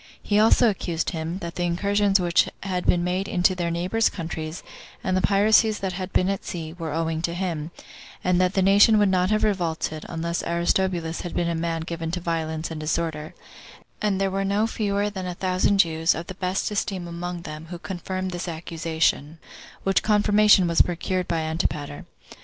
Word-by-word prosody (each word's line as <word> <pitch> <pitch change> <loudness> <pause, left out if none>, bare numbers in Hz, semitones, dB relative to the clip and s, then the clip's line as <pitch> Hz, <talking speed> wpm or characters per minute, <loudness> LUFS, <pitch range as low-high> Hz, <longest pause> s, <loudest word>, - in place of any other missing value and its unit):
He 205 0 +2
also 225 +2 +5
accused 175 -4 -3
him, 165 +1 -4
that 170 0 -5
the 180 - -5
incursions 200 +3 +2
which 175 -1 +2
had 185 -2 -2
been 175 -1 +3
made 185 +2 -1
into 180 +1 +2
their 175 -2 -2
neighbors' 180 +7 +1
countries, 160 -2 -6 0.4
and 185 - 0
the 185 - +2
piracies 215 +3 +4
that 190 -2 -3
had 185 +1 -5
been 185 - +2
at 195 0 -2
sea, 160 -2 -6
were 165 -3 -5
owing 160 0 -1
to 170 0 -2
him; 170 -4 -3 0.5
and 180 0 +2
that 185 +1 +1
the 190 - +3
nation 205 +3 +6
would 205 -2 +4
not 185 0 +2
have 215 0 +1
revolted, 165 -6 -1
unless 170 0 -2
Aristobulus 170 -1 0
had 175 - -6
been 170 - 0
a 170 - 0
man 165 0 -2
given 165 0 -4
to 180 - -1
violence 165 -1 -3
and 160 - -5
disorder; 155 0 -3 0.7
and 205 -2 +1
there 195 -1 +1
were 195 +1 -1
no 200 +2 +1
fewer 205 -2 -1
than 190 -2 -5
a 180 - -4
thousand 185 +2 +1
Jews, 165 -2 +3
of 165 - -5
the 185 - -7
best 185 +2 -2
esteem 195 -3 -2
among 170 0 -5
them, 155 +1 -8
who 175 +1 -7
confirmed 185 +1 -4
this 175 0 -5
accusation; 160 -2 -1 0.5
which 195 -1 +2
confirmation 210 -2 +4
was 170 -1 +4
procured 180 +1 -1
by 165 -1 0
Antipater. 155 -2 -3
175 Hz, 190 wpm, -24 LUFS, 165-195 Hz, 0.7 s, nation